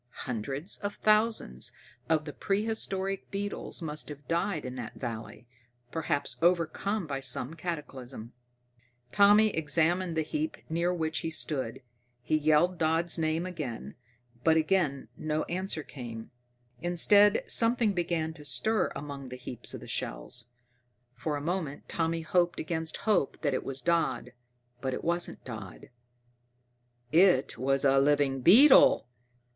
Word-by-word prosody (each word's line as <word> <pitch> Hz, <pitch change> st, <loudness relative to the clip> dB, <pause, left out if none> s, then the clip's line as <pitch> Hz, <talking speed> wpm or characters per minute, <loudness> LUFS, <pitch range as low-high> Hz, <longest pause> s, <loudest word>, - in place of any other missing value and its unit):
Hundreds 135 Hz, -, -4 dB
of 205 Hz, 0 st, -4 dB
thousands 215 Hz, -, +2 dB, 0.4 s
of 155 Hz, -2 st, +2 dB
the 150 Hz, -, -6 dB
prehistoric 195 Hz, -2 st, -2 dB
beetles 200 Hz, -3 st, -4 dB
must 150 Hz, -1 st, -2 dB
have 145 Hz, -1 st, -10 dB
died 170 Hz, -1 st, -1 dB
in 125 Hz, -, -5 dB
that 120 Hz, -3 st, -7 dB
valley, 115 Hz, -1 st, -7 dB, 0.5 s
perhaps 145 Hz, -3 st, -2 dB
overcome 175 Hz, +4 st, +1 dB
by 140 Hz, -3 st, -3 dB
some 135 Hz, +1 st, 0 dB
cataclysm. 135 Hz, -8 st, -6 dB, 0.8 s
Tommy 205 Hz, +2 st, +6 dB
examined 165 Hz, +1 st, +1 dB
the 160 Hz, -, +2 dB
heap 305 Hz, -, -3 dB
near 170 Hz, +2 st, +1 dB
which 160 Hz, -3 st, -1 dB
he 165 Hz, -, -3 dB
stood; 135 Hz, -6 st, -1 dB, 0.4 s
he 155 Hz, -, +1 dB
yelled 155 Hz, +4 st, +3 dB
Dodd's 165 Hz, +2 st, +1 dB
name, 160 Hz, +1 st, 0 dB, 1.0 s
but 160 Hz, 0 st, +4 dB
again 155 Hz, -4 st, +1 dB
no 155 Hz, 0 st, -1 dB
answer 180 Hz, -3 st, -3 dB
came. 115 Hz, -6 st, -8 dB, 0.5 s
Instead, 200 Hz, +5 st, +4 dB
something 230 Hz, -2 st, +3 dB
began 170 Hz, -3 st, -1 dB
to 150 Hz, -, -13 dB
stir 220 Hz, +9 st, +1 dB
among 140 Hz, -2 st, -7 dB
the 125 Hz, -, -7 dB
heaps 125 Hz, -1 st, -6 dB
of -, -, -9 dB
shells. -, -, -4 dB, 0.7 s
For 145 Hz, +5 st, -3 dB
a 145 Hz, -, -4 dB
moment 165 Hz, -4 st, -3 dB
Tommy 165 Hz, 0 st, -1 dB
hoped 175 Hz, 0 st, +1 dB
against 160 Hz, 0 st, -3 dB
hope 210 Hz, -10 st, +1 dB
that 145 Hz, -3 st, +1 dB
it -, -, -1 dB
was 135 Hz, 0 st, -4 dB
Dodd, 170 Hz, -7 st, 0 dB, 0.5 s
but 130 Hz, -1 st, -2 dB
it -, -, -7 dB
wasn't 170 Hz, +1 st, -1 dB
Dodd. 110 Hz, -6 st, -9 dB, 1.2 s
_It 175 Hz, -5 st, +4 dB
was 135 Hz, +3 st, +1 dB
a 135 Hz, 0 st, +5 dB
living 140 Hz, -1 st, +2 dB
beetle! 240 Hz, -, +7 dB
160 Hz, 130 wpm, -29 LUFS, 135-180 Hz, 1.2 s, beetle